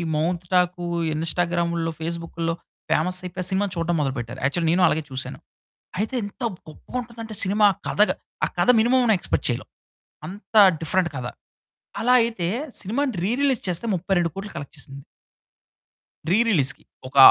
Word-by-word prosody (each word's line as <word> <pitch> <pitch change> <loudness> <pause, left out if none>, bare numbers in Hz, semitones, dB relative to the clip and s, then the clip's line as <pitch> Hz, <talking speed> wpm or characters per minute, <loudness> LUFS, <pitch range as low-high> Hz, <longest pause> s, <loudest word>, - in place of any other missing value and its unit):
Mouth 170 +3 0
talk, 180 -1 +2 0.3
ఇన్స్టాగ్రాముల్లో, 170 +1 0
ఫేస్బుకుల్లో 165 0 -3 0.4
పేమస్సయిపోయి, 180 +2 0
ఆ - - 0
cinema 195 +2 +2
చూడడం 170 0 0
మొదలుపెట్టారు, 130 -3 -3
యాక్చువల్లీ 160 +4 +1
నేను 180 +1 +3
అలాగే 160 0 +1
చూసాను. 130 -1 -5 0.6
అయితే 220 +5 -1
ఎంత 205 +5 -7 0.3
గొప్పగుంటుందంటే 230 +5 -7
సినిమా 205 +2 +3
ఆ - - -20
కథగ 210 +1 +3 0.3
ఆ - - -1
కథ - - +2
మినిమమ్ 250 +3 +4
అన్న 225 - +5
ఎక్స్పెక్ట్ - - -1
చేయలేవు. - - -3 0.6
అంత 205 +5 -11 0.3
డిఫరెంట్ 170 +2 +1
కథ. 125 -2 -4 0.8
అలా 245 +3 +3
అయితే 225 -7 -1 0.3
సినిమాని 250 +6 -1
రీ 200 - +1
రిలీజ్ 270 -5 +2
చేస్తే, 180 +5 -1
32,00,00,000 185 +2 -1
కలెక్ట్ 140 - -7
చేసింది. 140 -1 -7 1.3
రీ 195 - +5
రిలీజ్‌కి. 140 - +2 0.2
ఒక 130 - -8
175 Hz, 140 wpm, -24 LUFS, 165-210 Hz, 1.3 s, అన్న